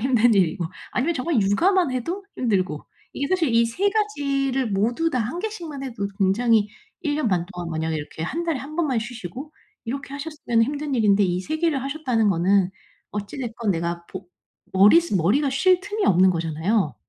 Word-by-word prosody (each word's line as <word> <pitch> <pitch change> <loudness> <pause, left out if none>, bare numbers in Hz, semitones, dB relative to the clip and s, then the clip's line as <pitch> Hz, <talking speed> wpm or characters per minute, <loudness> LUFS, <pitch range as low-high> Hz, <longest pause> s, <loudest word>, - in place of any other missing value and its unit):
힘든 240 -2 +3
일이고 175 -2 +2 0.3
아니면 315 +7 0
정말 260 -2 0
육아만 335 - +3
해도 340 +11 -3
힘들고. 185 - -1 0.3
이게 280 +1 -2
사실 330 -10 +1
이 230 0 +5
3 360 +13 0
가지를 275 - 0
모두 235 +11 +1
다 255 - 0
1 235 +10 -3
개씩만 340 -10 -5
해도 225 -6 -4
굉장히 210 +2 +3 0.3
1 295 -3 0
년 300 -7 0
반 175 -2 0
동안 175 -1 -6
만약에 160 0 -2
이렇게 150 +1 -6
1 315 - -3
달에 330 -5 -1
1 300 +3 -8
번만 295 -8 +1
쉬시고 245 - -7 0.3
이렇게 275 +3 -5
하셨으면은 280 -6 0
힘든 290 +2 -3
일인데 205 -4 +4
이 180 0 0
3 310 +10 -3
개를 315 -5 +1
하셨다는 265 -6 0
거는 185 +1 +2 0.4
어찌 205 +4 -5
됐건 235 -4 -2
내가 170 0 -3
보 190 0 -9 0.5
머리스 210 - +5
머리가 205 - +2
쉴 360 +7 +3
틈이 410 +2 -3
없는 185 +1 +5
거잖아요. 165 +2 0
240 Hz, 345 characters per minute, -23 LUFS, 195-300 Hz, 0.5 s, 이